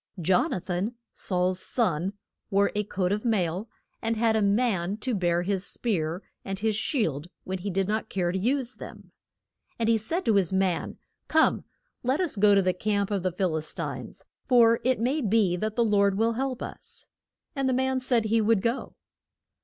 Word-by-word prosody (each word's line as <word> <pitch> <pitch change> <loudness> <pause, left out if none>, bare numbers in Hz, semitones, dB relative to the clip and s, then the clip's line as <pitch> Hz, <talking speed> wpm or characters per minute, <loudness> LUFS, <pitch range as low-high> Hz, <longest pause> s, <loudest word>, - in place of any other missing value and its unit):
Jon 180 +2 +2
a - - -1
than, 185 +6 -3 0.2
Saul's 180 0 0
son, 185 -5 0 0.4
wore 200 -1 +2
a 210 - 0
coat 190 -2 -1
of 210 +1 -1
mail, 200 -3 0 0.3
and 225 0 -1
had 225 0 +2
a 220 - +2
man 200 -3 +1
to 250 +3 -2
bear 175 -3 +1
his 190 0 0
spear 180 -6 -2 0.2
and 195 0 -4
his 220 +1 0
shield 170 - -1 0.2
when 190 0 -4
he 200 +3 -4
did 195 0 0
not 220 +1 -2
care 175 -2 0
to 190 - -2
use 255 +4 -1
them. - - -11 0.7
And 230 - 0
he 225 -1 +3
said 330 - -2
to 220 -3 +4
his 190 -3 +2
man, 190 -3 0 0.3
Come, 315 0 +3 0.4
let 260 +4 0
us 355 -8 +1
go 205 0 +5
to 195 - +4
the 185 0 +2
camp 200 +1 -1
of 200 -2 0
the 185 0 0
Phil 180 -2 -1
is 155 0 -4
tines. - - -6 0.2
For 235 -3 +5
it 255 -1 +2
may 260 +7 0
be 210 -5 +2
that 215 +3 -2
the 235 - +3
Lord 200 -2 +3
will 225 +2 +2
help 255 +1 -2
us. - - -7 0.5
And 270 -1 0
the - - +2
man 260 +1 +1
said 245 -3 +1
he 225 +1 +2
would 215 -2 +2
go. 235 +3 -2
210 Hz, 195 wpm, -27 LUFS, 185-230 Hz, 0.7 s, go